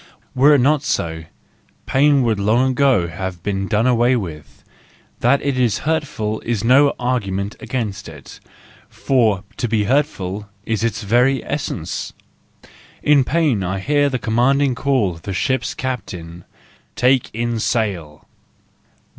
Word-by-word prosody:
Were 145 Hz, +3 st, +5 dB
it 135 Hz, -, +3 dB
not 145 Hz, +2 st, +3 dB
so, 80 Hz, -, -2 dB, 0.6 s
pain 140 Hz, 0 st, +3 dB
would 110 Hz, -4 st, 0 dB
long 120 Hz, +6 st, +2 dB
ago 130 Hz, -9 st, +2 dB
have 90 Hz, +1 st, -6 dB
been 95 Hz, -1 st, -2 dB
done 110 Hz, +2 st, +1 dB
away 125 Hz, 0 st, +3 dB
with; 80 Hz, -, -7 dB, 0.6 s
that 130 Hz, +4 st, +2 dB
it 140 Hz, -3 st, -1 dB
is 120 Hz, -4 st, +2 dB
hurtful 145 Hz, -9 st, -1 dB
is 115 Hz, -4 st, -2 dB
no 140 Hz, +4 st, +4 dB
argument 105 Hz, -6 st, -2 dB
against 105 Hz, -8 st, -4 dB
it, 75 Hz, -4 st, -12 dB, 0.5 s
for 110 Hz, -8 st, +1 dB
to 120 Hz, -, -1 dB
be 110 Hz, -2 st, +1 dB
hurtful 105 Hz, -6 st, -1 dB, 0.2 s
is 110 Hz, -1 st, -1 dB
its 115 Hz, -2 st, -2 dB
very 125 Hz, +6 st, +2 dB
essence. 95 Hz, -, -4 dB, 0.9 s
In 145 Hz, -2 st, +5 dB
pain 140 Hz, -, +1 dB
I 95 Hz, +2 st, -2 dB
hear 145 Hz, +8 st, +1 dB
the 130 Hz, -, -1 dB
commanding 130 Hz, +4 st, +2 dB
call 125 Hz, -6 st, +1 dB
of 80 Hz, -, -13 dB
the 95 Hz, -, -5 dB
ship's 130 Hz, +8 st, -1 dB
captain: 90 Hz, -10 st, -6 dB, 0.5 s
"Take 130 Hz, 0 st, +2 dB
in 115 Hz, +1 st, -2 dB
sail!" 95 Hz, -11 st, -2 dB
115 Hz, 140 wpm, -19 LUFS, 100-135 Hz, 0.9 s, Were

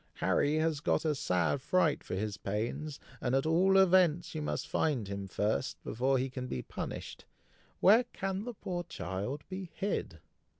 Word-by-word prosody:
Harry 145 Hz, +2 st, +2 dB
has 155 Hz, -1 st, +1 dB
got 150 Hz, -, +1 dB
a 155 Hz, -, +3 dB
sad 90 Hz, -, 0 dB
fright 165 Hz, 0 st, +2 dB
for -, -, -4 dB
his 105 Hz, +1 st, -2 dB
pains, 115 Hz, +10 st, -3 dB, 0.2 s
and 125 Hz, +1 st, +1 dB
at 135 Hz, -, +2 dB
all 185 Hz, +4 st, +4 dB
events 180 Hz, -3 st, +4 dB
you 155 Hz, -, -3 dB
must 150 Hz, -, -2 dB
find 130 Hz, -10 st, 0 dB
him 100 Hz, 0 st, -4 dB
first, 105 Hz, +3 st, -1 dB
before 130 Hz, +4 st, +1 dB
he 130 Hz, +1 st, 0 dB
can 125 Hz, -1 st, -5 dB
be 65 Hz, -, -4 dB
punished. -, -, -6 dB, 0.6 s
Where 220 Hz, +6 st, +7 dB
can 195 Hz, -3 st, -3 dB
the 245 Hz, -2 st, -5 dB
poor 180 Hz, -3 st, -3 dB
child 125 Hz, -, -4 dB
be 185 Hz, -2 st, -6 dB
hid?" 200 Hz, -, -2 dB
150 Hz, 170 wpm, -32 LUFS, 115-180 Hz, 0.6 s, Where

